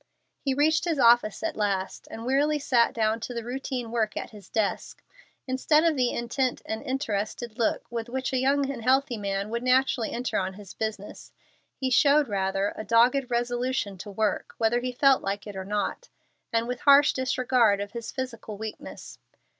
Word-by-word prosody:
He 270 -2 -1
reached 315 +4 +2
his 330 -3 0
office 235 -3 +4
at 330 -2 -2
last, 195 -3 -2
and 225 +1 -7
wearily 285 +4 +2
sat 245 -5 +2
down 220 0 0
to 245 +2 -6
the 235 - -3
routine 250 -1 -4
work 220 -3 -1
at - - -5
his 210 -3 -14
desk. 215 -3 -2 0.4
Instead 285 +4 +2
of 330 -2 +3
the 250 -3 +2
intent 240 +2 -2
and 220 0 -4
interested 235 -3 -3
look 230 - 0
with 230 -1 -4
which 265 +2 -3
a 260 - +2
young 275 +2 +2
and 250 -4 -6
healthy 260 +1 +2
man 200 +1 -3
would 235 0 -2
naturally 255 -2 +2
enter 245 +1 -1
on 190 0 -3
his 200 -1 -11
business, 215 -2 -6 0.4
he 260 -1 -2
showed 285 +3 +5
rather 195 0 -1
a - - -5
dogged 245 +4 +3
resolution 240 -3 -1
to 205 - -8
work 210 +1 -2
whether 230 +1 +2
he 250 +1 -3
felt 270 +1 +4
like 200 +1 -3
it 205 -2 -8
or 190 0 -5
not, 210 - -3 0.4
and 230 0 0
with 250 0 -3
harsh 285 0 +6
disregard 250 -5 +2
of 200 0 -5
his 235 0 -6
physical 230 -5 -6
weakness. 220 0 -8
240 Hz, 185 wpm, -26 LUFS, 215-260 Hz, 0.4 s, harsh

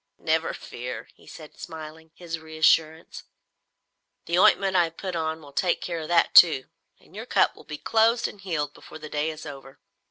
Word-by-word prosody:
Never - - 0
fear," 125 +1 -8
he - - -22
said 155 -2 -13
smiling 160 -2 -10
his 165 -2 -6
reassurance, 160 0 0 1.0
"the 170 - -1
ointment 195 0 +4
I 175 -2 +5
have 165 0 -10
put 185 -2 -5
on 160 -1 -2
will 140 -1 -14
take 175 +4 +1
care 170 -2 -4
of 155 - -6
that 170 0 +2
too, 160 -7 +7 0.4
and - - -21
your - - -7
cut - - +2
will - - -16
be 150 0 -7
closed 225 +5 +2
and 200 - -12
healed 150 -6 -3
before - - -12
the 155 -1 -10
day 150 +1 -1
is 155 0 -8
over. 135 -2 -10
160 Hz, 190 wpm, -25 LUFS, 155-175 Hz, 1.0 s, too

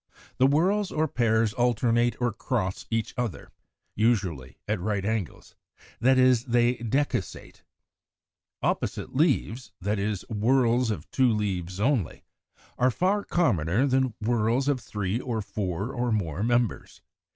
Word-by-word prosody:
The 130 - +5
whorls 185 +8 +2
or 155 +1 +1
pairs 110 -4 +1
alternate 120 -1 +1
or 120 -3 0
cross 120 0 -3
each 115 -1 -2
other, 115 -12 -4 0.4
usually 95 - 0
at 105 -1 -1
right 100 +1 -2
angles, 110 -5 -3 0.5
that 130 +2 +4
is, 130 -1 +4
they 120 0 +2
decussate. 130 +5 -3 1.0
Opposite - - -2
leaves, 130 -5 0
that 100 +3 -1
is, 100 -1 -2
whorls 120 +2 +2
of 90 -7 -4
two 130 -2 +3
leaves 95 -4 -2
only, 120 - 0 0.6
are 125 - +4
far 190 - +1
commoner 100 - +1
than 130 -3 +1
whorls 115 +4 +1
of 145 -3 +1
three 105 -1 -3
or 120 -3 -3
four 100 +1 -3
or 120 -1 -1
more 90 -6 -1
members. 120 -2 -1
115 Hz, 130 wpm, -26 LUFS, 105-130 Hz, 1.0 s, The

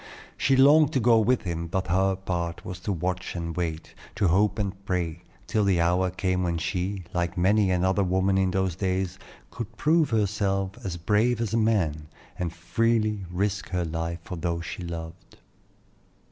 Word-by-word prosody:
She 135 - +2
longed 145 +3 +6
to 130 - +2
go 115 -1 +5
with 120 +3 +2
him; 85 -2 -3
but 95 +3 -1
her 95 +2 +2
part 85 -3 -4
was 90 -1 -6
to 100 - -3
watch 90 +1 -3
and 85 -2 -4
wait, 80 -2 -3 0.2
to 100 -4 +2
hope 100 +4 +2
and 100 -2 -3
pray, 85 -3 -2 0.2
till 110 -2 +1
the 95 -3 +2
hour 90 +2 +2
came 90 0 -1
when 85 -2 0
she, 95 +3 -2
like 85 +1 -1
many 100 +2 +3
another 95 +2 +2
woman 95 +1 +1
in 95 -1 +2
those 95 -2 0
days, 95 0 -2 0.3
could 115 -1 -7
prove 160 0 +3
herself 100 -3 0
as 90 -3 -4
brave 105 +7 +2
as 115 -3 -2
a - - +3
man, 90 -10 +1 0.3
and 85 -2 -1
freely 105 +3 0
risk 100 +3 -2
her 90 -2 -1
life 80 +1 -3
for 90 - -6
those 85 0 -2
she 90 - -6
loved. 85 0 -8
95 Hz, 175 wpm, -26 LUFS, 85-105 Hz, 0.3 s, longed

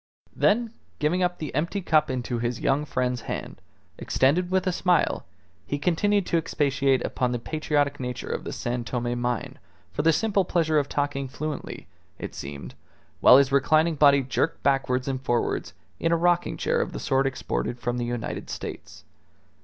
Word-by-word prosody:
Then 230 +2 +2 0.2
giving 165 +5 +1
up 180 0 +1
the 155 -3 -5
empty 170 +7 -1
cup 160 -4 +2
into 125 -2 -2
his 120 0 -2
young 140 +2 +1
friend's 125 -3 -1
hand, - - -6 0.4
extended 165 +7 +2
with 185 0 +1
a 185 - +2
smile, 180 - +1 0.4
he 145 - -1
continued 195 +6 +1
to 170 - +1
expatiate 135 -4 +1
upon 125 -1 -1
the 120 - 0
patriotic 145 +2 -1
nature 125 -1 -4
of - - -3
the - - -5
San 120 0 -3
Tome 120 0 -2
mine 120 -2 -2 0.3
for - - -1
the 165 +2 +4
simple 205 +2 +1
pleasure 160 -3 +2
of 140 - -2
talking 145 -1 -1
fluently, 150 +2 -5 0.3
it - - -6
seemed, 70 +1 -7 0.5
while 125 - +8
his 140 -1 +3
reclining 155 +4 +3
body 140 -2 +5
jerked 150 +5 -1
backwards 135 -2 +1
and 130 -1 -2
forwards 120 -2 -1 0.2
in 165 - +1
a 170 - +4
rocking 175 +1 +1
chair - - +1
of - - -3
the - - -4
sort 135 0 +1
exported 120 - -3
from 120 +1 -2
the 120 - -1
United 120 -1 -4
States. - - -7
140 Hz, 175 wpm, -25 LUFS, 125-165 Hz, 0.5 s, while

